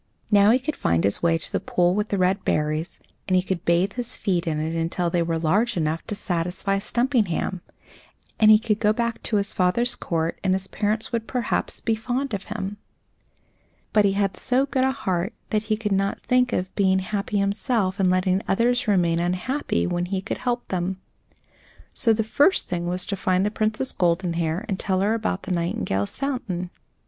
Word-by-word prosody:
Now 205 0 +6
he 235 - +6
could 285 +4 -4
find 85 0 +1
his 100 - +1
way 165 -1 +3
to - - -6
the - - 0
pool 175 0 +1
with 210 +2 -1
the 200 - 0
red 185 +1 +1
berries, 155 +2 -1 0.3
and 185 - +2
he 180 - +3
could 185 -2 -3
bathe 175 +4 +2
his 245 0 -4
feet 175 -4 -1
in 155 -2 0
it 160 +2 -2
until 170 +1 -1
they 175 - +1
were 165 -1 0
large 185 +8 +1
enough 160 0 0
to 210 - -3
satisfy 180 +2 -1
Stumpinghame; 215 -6 0 0.8
and 215 - +6
he 215 - +9
could 215 -1 -1
go 210 -1 +3
back 235 0 -2
to 220 - -2
his 200 0 0
father's 210 +6 +1
court, 165 -1 -2
and 190 -1 +2
his 190 0 -3
parents 215 +2 -2
would 230 -2 -2
perhaps; 250 -2 -2
be 225 - 0
fond 245 +4 -2
of 195 -1 -3
him. 205 -1 -5 1.2
But 210 -1 +5
he 195 - +3
had 195 -2 0
so 255 +2 +1
good 265 -2 0
a 265 - +3
heart 190 -6 -2 0.2
that 215 -1 0
he 215 - +2
could 210 -2 -3
not 195 0 0
think 250 0 +2
of 185 -2 -2
being 190 -2 +3
happy 200 +2 -2
himself 200 0 0
and 190 -1 +3
letting 185 +1 +2
others 240 +5 +1
remain 175 -5 +2
unhappy, 180 - -1
when 175 - -1
he 190 +1 -1
could 195 - -5
help 245 -1 -2
them. 185 +1 -2 0.9
So 230 - +7
the 220 0 +2
first 285 - +2
thing 175 -1 -3
was 180 +1 -1
to 200 - -3
find 185 0 +1
the 210 - 0
Princess 215 +4 -1
Goldenhair 170 +1 0
and 195 -4 -2
tell 190 -2 0
her 205 +3 +2
about 220 -4 -2
the 185 - -5
nightingales' 170 - -1
fountain. 215 -11 -3
195 Hz, 200 wpm, -24 LUFS, 175-220 Hz, 1.2 s, he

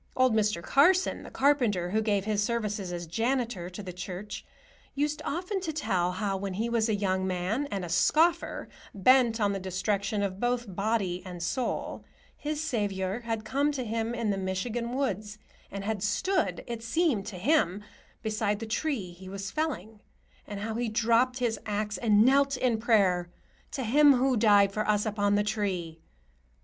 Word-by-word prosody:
Old 255 -2 +4
Mr. 210 -5 +1
Carsen, 355 - +3
the - - -10
carpenter, 235 -11 +2
who 220 +2 +2
gave 205 -3 0
his 210 -1 0
services 210 -4 -2
as 175 -1 -4
janitor 225 0 -1
to 185 +3 -8
the 180 -1 -7
church, 185 +3 -6 0.5
used 295 +1 -1
often 365 +6 -2
to 335 -4 -2
tell 180 - 0
how, 195 +1 -1
when 190 -1 -4
he 225 +4 -1
was 230 -1 +1
a 215 - +2
young 190 -2 0
man 190 +10 -1
and 195 -8 -3
a - - -6
scoffer, 320 - +2 0.3
bent 235 +3 +4
on 205 -2 +2
the 195 - -3
destruction 200 +3 -1
of 190 -1 -3
both 245 +1 0
body 195 -3 0
and 180 -2 -7
soul, 250 +8 -2 0.3
his 300 0 -3
Saviour 205 -8 -1
had 225 -2 -4
come 285 +2 +1
to 265 -3 -3
him 225 +1 -2
in 230 -3 0
the 195 - -1
Michigan 230 +6 -2
woods 210 -6 -2 0.3
and 200 0 -6
had 210 -1 -2
stood, 315 - 0
it 235 -2 -5
seemed 230 - 0
to 200 -4 -6
him, 205 - +2 0.4
beside 215 -1 0
the 225 - -5
tree 220 - -2
he 185 +2 -11
was 195 0 -5
felling; 225 - -3 0.5
and 205 -1 -6
how 220 +1 -3
he 235 +1 -1
dropped 230 +3 +2
his 240 -3 -1
axe 210 0 -2
and 215 -2 +4
knelt 275 +1 +4
in 245 -3 +1
prayer 195 -6 +2 0.4
"to 270 - -4
Him 285 +5 +6
who 260 0 +2
died 205 -3 +5
for 215 +1 -2
us 210 0 +2
upon 205 -1 +1
the 205 - +2
tree." 190 -6 -2
215 Hz, 180 wpm, -28 LUFS, 195-245 Hz, 0.5 s, Him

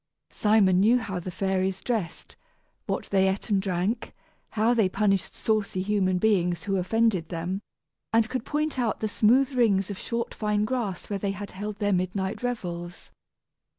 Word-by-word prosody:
Simon 205 -4 +4
knew 225 +5 +5
how 200 -6 -3
the 175 - -6
fairies 190 +1 -1
dressed, 220 -8 -3 0.5
what - - -2
they 190 -1 +4
ate 195 +3 -3
and 195 -2 +3
drank, 190 +4 -2 0.4
how 225 +2 +3
they 220 -6 +3
punished 195 -1 0
saucy 210 -4 0
human 190 -2 +1
beings 180 -5 +1
who 195 +1 0
offended 185 -2 +1
them; 175 +3 -3 0.5
and 225 -1 +3
could 255 0 -3
point 300 -1 -1
out 235 -3 0
the 215 - -1
smooth 250 +6 +3
rings 205 -6 +2
of 195 - -6
short 235 0 -3
fine 210 -1 0
grass 215 -6 -3
where 200 -1 -3
they 195 0 -1
had 200 0 -7
held 205 +2 -5
their 205 0 0
midnight 190 +3 -1
revels. 175 -8 -5
200 Hz, 165 wpm, -26 LUFS, 185-220 Hz, 0.5 s, knew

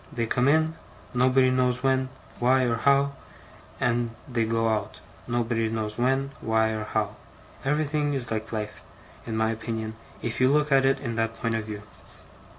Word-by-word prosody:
They 115 - -1
come 125 +3 +1
in, 160 +2 +3 0.4
nobody 130 +1 +4
knows 125 0 +1
when, 130 -1 +2 0.3
why, 130 +2 +4
or 120 -2 +1
how; 140 +3 +3 0.7
and 120 0 +1 0.2
they 120 -4 0
go 115 0 +1
out, 110 -1 -1 0.3
nobody 120 -1 0
knows 110 0 -3
when, 135 +2 +1
why, 110 0 +2
or 110 -1 -3
how. 105 -1 -1 0.5
Everything 145 +1 +1
is 120 -4 -3
like 110 0 -3
life, 105 -1 -4 0.5
in 110 -1 -2
my 110 0 +2
opinion, 110 -1 -4 0.3
if 115 +2 -2
you 130 +1 +5
look 150 0 +2
at 135 -1 +5
it 135 - +2
in 120 -4 -3
that 115 0 0
point 115 -1 0
of 110 -1 -1
view. 105 -1 -6
120 Hz, 170 wpm, -26 LUFS, 110-135 Hz, 0.7 s, you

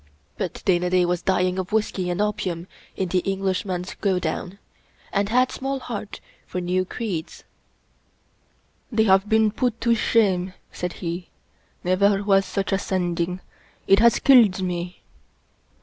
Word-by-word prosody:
But - - -5
Dana 180 -1 +2
Da 180 0 +3
was 175 0 -1
dying 185 0 +1
of 185 +2 -4
whisky 210 -4 0
and 175 +1 -2
opium 200 -5 -1 0.3
in 190 -2 -2
the 185 - +2
Englishman's 190 -1 -2
go 195 -3 +2
down, 180 +1 -3 0.6
and 200 0 +1
had 250 +2 +3
small 270 +1 -3
heart 215 -5 -6 0.3
for 180 - -4
new 180 +1 0
creeds. 185 -6 -5 0.8
" - - -41
They 220 -2 +3
have 195 0 +3
been 220 -1 +4
put 240 +1 -1
to 235 0 +3
shame," 190 -5 +2 0.2
said 180 0 -4
he. 170 +1 -4 0.3
" - - -39
Never 195 +2 +2
was 195 -1 +3
such 195 +1 -2
a 195 - +2
Sending. 180 -1 -2 0.4
It 195 - +5
has 235 0 +5
killed 230 -9 +6
me." 175 0 -4
190 Hz, 150 wpm, -23 LUFS, 180-210 Hz, 0.8 s, killed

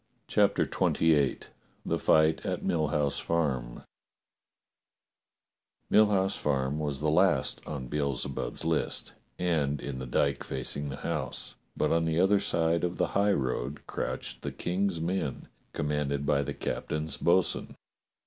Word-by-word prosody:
CHAPTER - - +3
XXVIII 75 -5 +2 0.4
THE - - 0
FIGHT 80 0 +3
AT - - -2
MILL 80 -2 +1
HOUSE 70 0 0
FARM 65 -8 -1 2.1
MILL 110 0 +7
HOUSE 95 -2 +1
FARM 70 0 0
was 75 -3 -2
the 75 - +2
last 85 -4 +2
on 70 -4 -5
Beelze 70 -2 -1
bub's 80 - -4
list, 80 -1 -1 0.2
and 75 -5 0
in 65 -2 -5
the 65 - -5
dyke 70 +3 +1
facing 70 +2 -3
the 70 - -4
house, 65 -2 -3 0.2
but - - +1
on 80 0 +2
the 80 0 +1
other 95 +2 +4
side 85 -4 +1
of 90 0 -1
the - - +1
highroad 70 -8 0
crouched - - -4
the - - -4
King's 90 -1 -1
men, 85 -4 -2 0.2
commanded 70 -1 -1
by 70 0 +2
the 70 - -4
captain's 75 -1 -3
bo'sun. - - +2
75 Hz, 140 wpm, -29 LUFS, 70-85 Hz, 2.1 s, MILL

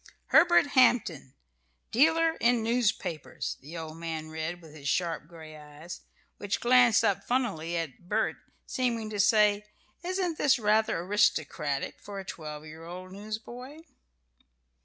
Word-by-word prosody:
"Herbert 345 +1 +6
Hampton, 230 - +2 0.6
Dealer 320 +5 +4
in 235 -1 +2
Newspapers," 210 - -1
the 155 +5 -9
old 160 -1 -7
man 160 -1 -5
read, 160 +2 -4
with 160 -3 -15
his 140 -3 -5
sharp 165 -2 -1
gray 160 -2 -12
eyes, 150 +3 -10 0.4
which 205 0 -2
glanced 245 -1 +5
up 200 - +1
funnily 175 -10 -1
at 165 +2 -6
Bert, 220 +1 0 0.3
seeming 230 -4 -2
to 205 - -4
say, 210 0 +4 0.4
"Isn't 360 -2 -2
this 275 -2 +4
rather 215 -1 +2
aristocratic 150 -7 0
for 200 -1 -9
a 190 - -8
twelve 155 -3 -7
year 155 +1 -11
old 180 +2 -9
newsboy?" 230 +8 -8
200 Hz, 135 wpm, -29 LUFS, 160-240 Hz, 0.6 s, Herbert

